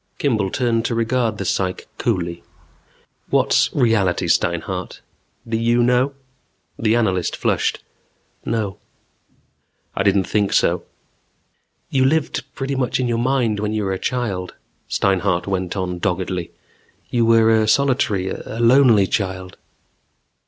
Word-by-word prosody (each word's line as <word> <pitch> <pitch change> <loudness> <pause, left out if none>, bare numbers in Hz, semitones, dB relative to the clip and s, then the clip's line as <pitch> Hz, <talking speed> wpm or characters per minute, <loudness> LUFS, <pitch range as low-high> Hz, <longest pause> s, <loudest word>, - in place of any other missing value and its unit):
Kimball 110 -9 0
turned 115 0 0
to 115 - -1
regard 115 -1 0
the 100 - -4
psych 95 +1 -1
coolly. 85 -7 -1 0.9
"What's - - +3
reality, 110 -8 +1
Steinhart? - - -1 0.5
Do 115 - -2
you 120 +1 +2
know?" 125 +3 +2 0.7
The 110 0 +2
analyst 95 -7 0
flushed. - - -1 0.6
"No." 110 -4 -2 1.2
"I - - -1
didn't 100 -1 +3
think 100 +1 0
so." - - +2 1.1
"You 130 -1 +2
lived 145 0 +1
pretty 135 +1 -3
much 130 -2 -1
in 125 - 0
your 115 -1 0
mind 120 -4 +1
when 105 +1 -2
you 110 -1 -1
were 95 -1 -1
a 95 - -4
child," 100 -8 -3 0.3
Steinhart 95 -2 +1
went 95 0 -2
on 90 -2 -3
doggedly. 90 -1 -2 0.6
"You 120 -1 +2
were 115 0 +5
a 110 -1 +2
solitary, 120 -6 +2
a 110 - -6
lonely 120 -4 +5
child." 95 -2 -3
110 Hz, 130 wpm, -20 LUFS, 95-120 Hz, 1.2 s, were